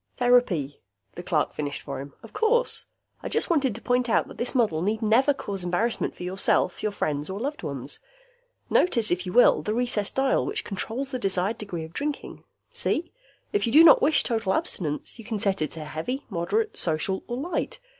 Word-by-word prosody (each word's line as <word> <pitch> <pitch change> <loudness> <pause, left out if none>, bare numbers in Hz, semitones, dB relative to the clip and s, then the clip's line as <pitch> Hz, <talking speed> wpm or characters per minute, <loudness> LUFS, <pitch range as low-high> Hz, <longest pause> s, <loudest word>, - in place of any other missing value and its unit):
"Therapy," 230 - +2 0.3
the 175 - -7
clerk 160 -4 0
finished 145 -1 -4
for 140 -2 -5
him. 140 0 -10
"Of 225 - -13
course. 475 +3 +2 0.4
I - - -5
just - - 0
wanted 270 -9 +2
to 230 - -9
point 245 0 +1
out 190 - +2
that - - -12
this 240 +4 -2
model 210 -11 +2
need 215 +5 -1
never 235 +7 +4
cause 200 -9 -4
embarrassment 185 +7 -1
for - - -8
yourself, 180 0 +1
your 215 - -1
friends 150 -6 -2
or 190 +1 -4
loved 285 +6 -3
ones. - - -5 0.7
Notice, 235 -11 +2
if 180 +1 -1
you - - -3
will, 245 - +6
the 215 - -2
recessed 235 -4 0
dial 270 0 +2
which 430 +3 -3
controls 235 +7 -4
the 255 - -3
desired 195 +1 0
degree 180 -6 -5
of 160 +1 -10
drinking. 290 +4 -4 0.3
See? 335 - -1 0.4
If 410 -11 +1
you - - 0
do 310 +6 +8
not 335 - +8
wish 285 +1 +4
total 220 -5 0
abstinence, 150 +6 -3
you - - -8
can 220 0 -3
set 195 -3 0
it 155 - 0
to 155 - -6
heavy, 205 - -4
moderate, 200 - -1
social 170 +4 0
or 240 - -3
light. 345 - -3
220 Hz, 200 wpm, -26 LUFS, 180-255 Hz, 0.7 s, do